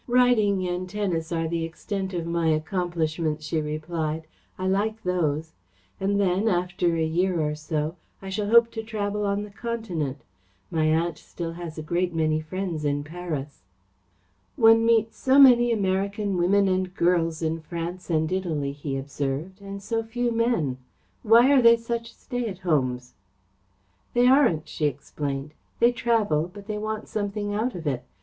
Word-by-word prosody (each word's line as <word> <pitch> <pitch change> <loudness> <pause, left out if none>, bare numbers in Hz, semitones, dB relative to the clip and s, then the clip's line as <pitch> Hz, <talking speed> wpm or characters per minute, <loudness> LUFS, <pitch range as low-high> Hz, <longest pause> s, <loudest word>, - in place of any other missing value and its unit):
"Riding 225 -7 +3
and 180 +1 -3
tennis 180 -5 -2
are 165 -1 0
the 165 0 -2
extent 190 +4 -4
of 170 -1 -2
my 170 -1 0
accomplishments," 160 -1 -1
she 155 +1 -1
replied. 155 +1 -3 0.3
"I 185 - -3
like 215 +4 0
those. 160 -3 -1 0.5
And 200 +1 +1
then, 195 +2 +2
after 175 -2 +1
a 160 -1 +1
year 175 +2 +1
or 150 -1 0
so, 155 +2 -3 0.2
I 195 - -8
shall 205 +1 -2
hope 235 +1 +6
to 225 - -4
travel 210 -2 -2
on 200 +1 0
the 210 - -9
Continent. 190 - -4 0.5
My 160 -1 +1
aunt 165 +2 +1
still 170 -1 -6
has 165 -1 -7
a 155 - -5
great 175 +2 -1
many 155 -1 +1
friends 170 0 -4
in 145 0 0
Paris." 155 -3 -6 0.9
"One 225 0 +6
meets 225 -1 +2
so 265 +1 +3
many 245 -3 +7
American 200 -1 0
women 195 +3 +3
and 185 0 -1
girls 165 -2 +1
in 160 +1 -1
France 170 +3 -6
and 160 -1 +1
Italy," 160 -7 -1
he 140 -1 -4
observed, 145 +7 -4
"and 200 0 -8
so 225 +2 -1
few 240 +2 -2
men. 225 - 0 0.4
Why 235 +4 +6
are 275 -2 +6
they 235 -1 +7
such 230 0 -4
stay 245 -2 -4
at 190 -3 -7
homes?" 130 -6 0 1.0
"They 245 0 +5
aren't," 250 - +4
she 150 - 0
explained. 140 +1 -4 0.3
"They 235 +1 +5
travel, 215 -10 +1
but 200 +1 -11
they 210 0 -3
want 215 0 -4
something 205 0 -3
out 225 +3 -1
of 170 -2 -7
it. 135 -4 -1
180 Hz, 165 wpm, -25 LUFS, 160-210 Hz, 1.0 s, many